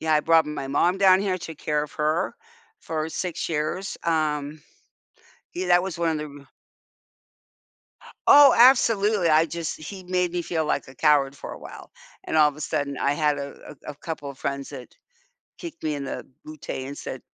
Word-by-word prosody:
Yeah, 160 Hz, -1 st, +1 dB
I 150 Hz, -, +4 dB
brought 165 Hz, 0 st, +4 dB
my 150 Hz, -2 st, -5 dB
mom 175 Hz, +7 st, +1 dB
down 190 Hz, -1 st, +6 dB
here, 190 Hz, -2 st, -1 dB
took 160 Hz, -3 st, -9 dB
care 150 Hz, -1 st, -1 dB
of 150 Hz, -, -7 dB
her 155 Hz, +4 st, -1 dB, 0.5 s
for 160 Hz, -1 st, -3 dB
6 175 Hz, +1 st, -4 dB
years. 160 Hz, +5 st, -3 dB
Um, 150 Hz, -2 st, -1 dB, 0.9 s
yeah, 185 Hz, +1 st, -3 dB
that 175 Hz, 0 st, +4 dB
was 190 Hz, -3 st, -5 dB
one 170 Hz, -1 st, +1 dB
of 155 Hz, -, -2 dB
the 150 Hz, -1 st, -7 dB
r 140 Hz, -, -21 dB, 1.8 s
Oh, 285 Hz, -2 st, +9 dB
absolutely, 220 Hz, -6 st, +4 dB
I 155 Hz, +1 st, +4 dB
just 170 Hz, -1 st, -4 dB
he 185 Hz, +4 st, -9 dB
made 180 Hz, -1 st, 0 dB
me 175 Hz, 0 st, -2 dB
feel 160 Hz, -1 st, -2 dB
like 150 Hz, -, -1 dB
a 130 Hz, -, -13 dB
coward 140 Hz, -1 st, +2 dB
for -, -, -8 dB
a -, -, -9 dB
while, -, -, -11 dB, 0.3 s
and -, -, -2 dB
all 155 Hz, -1 st, +6 dB
of 145 Hz, -, -6 dB
a 150 Hz, -, -13 dB
sudden 140 Hz, -2 st, -2 dB
I 140 Hz, -, +1 dB
had 150 Hz, -1 st, +1 dB
a 140 Hz, +1 st, -8 dB
a -, -, -4 dB
a -, -, -17 dB
couple 145 Hz, -2 st, -6 dB
of 135 Hz, -, -13 dB
friends 140 Hz, 0 st, -4 dB
that -, -, -10 dB, 0.7 s
kicked 335 Hz, -, -9 dB
me 155 Hz, -, -1 dB
in 140 Hz, -1 st, -4 dB
the 135 Hz, -, -6 dB, 0.2 s
booty 155 Hz, -3 st, -7 dB
and 140 Hz, +1 st, -8 dB
said, 130 Hz, -, -7 dB
155 Hz, 195 wpm, -24 LUFS, 145-180 Hz, 1.8 s, Oh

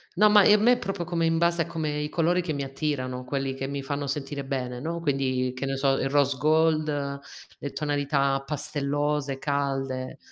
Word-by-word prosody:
No, 210 Hz, +3 st, +6 dB
ma 205 Hz, -1 st, +7 dB
ehm, 210 Hz, +1 st, +6 dB
me 245 Hz, +2 st, +5 dB
proprio 195 Hz, -5 st, -4 dB
come 170 Hz, -1 st, 0 dB
in 165 Hz, 0 st, +2 dB
base 170 Hz, 0 st, +2 dB
a -, -, -9 dB
come 155 Hz, -3 st, -2 dB
i 150 Hz, -, -3 dB
colori 175 Hz, +2 st, +2 dB
che 170 Hz, -2 st, -3 dB
mi 140 Hz, -2 st, -2 dB
attirano, 135 Hz, -2 st, -3 dB
quelli 135 Hz, 0 st, -2 dB
che 135 Hz, 0 st, -4 dB
mi 140 Hz, 0 st, -3 dB
fanno 145 Hz, 0 st, -3 dB
sentire 140 Hz, 0 st, -3 dB
bene, 125 Hz, -2 st, -3 dB
no, 170 Hz, +2 st, -3 dB
quindi, 130 Hz, -4 st, 0 dB
che 135 Hz, +2 st, -3 dB
ne 135 Hz, -, -1 dB
so, 135 Hz, 0 st, +2 dB
il 135 Hz, -, 0 dB
rose 140 Hz, -1 st, +3 dB
gold, 155 Hz, -2 st, +1 dB, 0.4 s
le 145 Hz, -, -4 dB
tonalità 140 Hz, -2 st, 0 dB
pastellose, 145 Hz, -1 st, -1 dB
calde. 135 Hz, -2 st, -2 dB
145 Hz, 190 wpm, -26 LUFS, 135-160 Hz, 0.4 s, ma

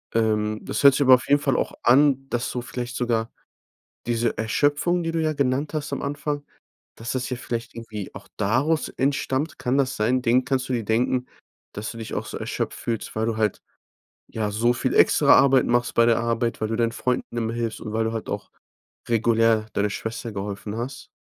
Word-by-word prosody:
Ähm, 110 Hz, -1 st, +1 dB
das -, -, -3 dB
hört 140 Hz, -2 st, +8 dB
sich 145 Hz, -, 0 dB
aber 130 Hz, -, +7 dB
auf 125 Hz, -, -5 dB
jeden 145 Hz, +1 st, +4 dB
Fall 135 Hz, -3 st, +1 dB
auch -, -, -1 dB
an, 135 Hz, +1 st, +4 dB
dass 120 Hz, +1 st, -1 dB
so 125 Hz, -, -3 dB
vielleicht 125 Hz, 0 st, -5 dB
sogar 115 Hz, -2 st, -1 dB, 0.7 s
diese 120 Hz, 0 st, 0 dB
Erschöpfung, 145 Hz, +9 st, +1 dB
die 165 Hz, -, -1 dB
du 165 Hz, -, 0 dB
ja 155 Hz, 0 st, +1 dB
genannt 140 Hz, +2 st, 0 dB
hast 150 Hz, -2 st, -3 dB
am -, -, -3 dB
Anfang 145 Hz, 0 st, -3 dB, 0.5 s
dass 115 Hz, +2 st, -5 dB
das 130 Hz, 0 st, -3 dB
ja 125 Hz, -, -2 dB
vielleicht 115 Hz, -1 st, -5 dB
irgendwie 110 Hz, -4 st, -7 dB
auch -, -, -10 dB
daraus 135 Hz, +10 st, +1 dB
entstammt. 135 Hz, +2 st, -1 dB
Kann 130 Hz, +3 st, 0 dB
das 130 Hz, -1 st, +1 dB
sein? 120 Hz, +4 st, +1 dB
Den 125 Hz, +1 st, +2 dB
kannst 130 Hz, 0 st, -1 dB
du -, -, -2 dB
dir 115 Hz, -3 st, -1 dB
denken, 125 Hz, +3 st, +1 dB, 0.5 s
dass 105 Hz, +2 st, -5 dB
du 115 Hz, -, -10 dB
dich 110 Hz, -1 st, -7 dB
auch -, -, -3 dB
so -, -, -7 dB
erschöpft -, -, -3 dB
fühlst, 115 Hz, -2 st, -4 dB
weil 110 Hz, +1 st, -1 dB
du 115 Hz, -1 st, -1 dB
halt, 105 Hz, -3 st, 0 dB, 0.7 s
ja, 110 Hz, -2 st, -2 dB
so 115 Hz, +4 st, +2 dB
viel 120 Hz, -, -1 dB
extra -, -, +6 dB
Arbeit 135 Hz, -1 st, +5 dB
machst 120 Hz, 0 st, +1 dB
bei 115 Hz, -, +4 dB
der 115 Hz, -1 st, +3 dB
Arbeit, 115 Hz, -1 st, -1 dB
weil 110 Hz, -, -1 dB
du 115 Hz, -, -1 dB
deinen 115 Hz, 0 st, +1 dB
Freunden 125 Hz, -1 st, -2 dB
immer 115 Hz, -1 st, -1 dB
hilfst 115 Hz, -2 st, -3 dB
und 110 Hz, -, -6 dB
weil 110 Hz, 0 st, +1 dB
du 110 Hz, -, -2 dB
halt 115 Hz, -, -5 dB
auch -, -, -4 dB, 0.6 s
regulär 115 Hz, -1 st, +3 dB
deiner 105 Hz, +1 st, +1 dB
Schwester 115 Hz, +2 st, -5 dB
geholfen 100 Hz, +1 st, -5 dB
hast? 125 Hz, +4 st, -6 dB
120 Hz, 210 wpm, -24 LUFS, 110-130 Hz, 0.7 s, hört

